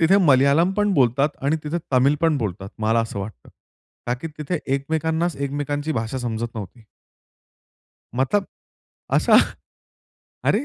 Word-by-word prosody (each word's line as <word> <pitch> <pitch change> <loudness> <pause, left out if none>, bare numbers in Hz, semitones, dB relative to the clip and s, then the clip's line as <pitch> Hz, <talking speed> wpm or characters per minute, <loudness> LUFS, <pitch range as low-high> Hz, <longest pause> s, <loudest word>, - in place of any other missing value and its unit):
तिथे 170 +4 +5
मल्याळम 145 +2 +4
पण 205 -1 +2
बोलतात 135 +1 +3
आणि 145 +4 +2
तिथे 155 +3 -1
तमिल 130 +3 +4
पण 165 -2 +3
बोलतात 100 -4 -4
मला 110 +1 +2
असं 115 -3 -4
वाटतं. 100 - -8 0.6
का 120 - +1
की 125 +6 -7
तिथे 155 +3 -2 0.2
एकमेकांनाच 160 +4 -1
एकमेकांची 145 +2 -2
भाषा 115 +1 -2
समजत 120 -1 -2
नव्हती. 110 +2 -8 1.3
मतलब 135 +11 +1 0.7
असा? - - +5 1.1
अरे! - - +2
140 Hz, 130 wpm, -22 LUFS, 115-160 Hz, 1.3 s, तिथे